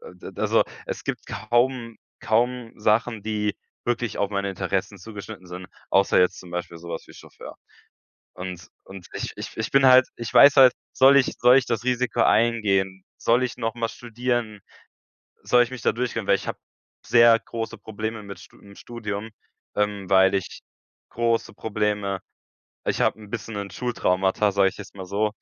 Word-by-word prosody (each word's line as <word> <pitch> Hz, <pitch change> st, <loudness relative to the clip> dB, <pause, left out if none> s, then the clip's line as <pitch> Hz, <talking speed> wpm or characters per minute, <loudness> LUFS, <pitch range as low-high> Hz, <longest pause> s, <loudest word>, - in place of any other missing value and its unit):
D -, -, -10 dB
d -, -, -7 dB
also -, -, +3 dB, 0.2 s
es -, -, -6 dB
gibt 130 Hz, -4 st, -4 dB
kaum 120 Hz, +2 st, 0 dB, 0.2 s
kaum 120 Hz, +1 st, 0 dB
Sachen, 110 Hz, +1 st, +1 dB
die 105 Hz, -1 st, -1 dB, 0.3 s
wirklich 120 Hz, -2 st, -1 dB
auf 100 Hz, -, 0 dB
meine 100 Hz, -1 st, -2 dB
Interessen 95 Hz, +1 st, -3 dB
zugeschnitten 100 Hz, 0 st, -10 dB
sind, 90 Hz, +1 st, -9 dB, 0.2 s
außer 95 Hz, 0 st, +4 dB
jetzt 90 Hz, 0 st, +2 dB
zum 90 Hz, -, -13 dB
Beispiel 85 Hz, -1 st, -5 dB
sowas 85 Hz, 0 st, -7 dB
wie -, -, -14 dB
Chauffeur. -, -, -12 dB, 0.8 s
Und 90 Hz, -1 st, -7 dB, 0.2 s
und 95 Hz, -2 st, -11 dB
ich -, -, -4 dB
ich -, -, -7 dB
ich 110 Hz, 0 st, -3 dB
bin 135 Hz, 0 st, +5 dB
halt 130 Hz, 0 st, +7 dB
ich 120 Hz, -1 st, -6 dB
weiß 140 Hz, 0 st, +8 dB
halt, 130 Hz, -2 st, +8 dB, 0.2 s
soll 135 Hz, +1 st, +6 dB
ich 135 Hz, -, +2 dB
soll 125 Hz, +1 st, +6 dB
ich 130 Hz, -, +1 dB
das 115 Hz, -2 st, -2 dB
Risiko 125 Hz, 0 st, 0 dB
eingehen? 100 Hz, -5 st, +2 dB
Soll 120 Hz, +2 st, +2 dB
ich 125 Hz, -, -3 dB
nochmal 115 Hz, -1 st, -2 dB
studieren? 120 Hz, -2 st, -3 dB, 0.8 s
Soll 125 Hz, 0 st, +4 dB
ich 120 Hz, -, -2 dB
mich 130 Hz, -1 st, -7 dB
da -, -, +2 dB
durchkämpfen? 115 Hz, -2 st, -3 dB
Weil -, -, +6 dB
ich -, -, -9 dB
habe -, -, -4 dB, 0.5 s
sehr 115 Hz, -1 st, +6 dB
große 115 Hz, 0 st, -6 dB
Probleme 110 Hz, +1 st, -5 dB
mit 100 Hz, -1 st, -9 dB
St -, -, -15 dB
im 100 Hz, -1 st, -16 dB
Studium, 110 Hz, -1 st, -6 dB, 0.5 s
ähm, 105 Hz, -2 st, -1 dB
weil 95 Hz, 0 st, +5 dB
ich 95 Hz, -2 st, -3 dB, 0.5 s
große 115 Hz, 0 st, -1 dB
Probleme 105 Hz, -3 st, -2 dB, 0.7 s
ich -, -, -1 dB
habe -, -, +1 dB
'n 105 Hz, -, -12 dB
bisschen 110 Hz, -1 st, -5 dB
'n 100 Hz, -1 st, -5 dB
Schultraumata, 100 Hz, -4 st, 0 dB
sage 100 Hz, -1 st, +3 dB
ich -, -, -16 dB
jetzt 100 Hz, -, -10 dB
mal 95 Hz, -, -7 dB
so, 105 Hz, +3 st, -1 dB
110 Hz, 175 wpm, -24 LUFS, 100-120 Hz, 0.8 s, weiß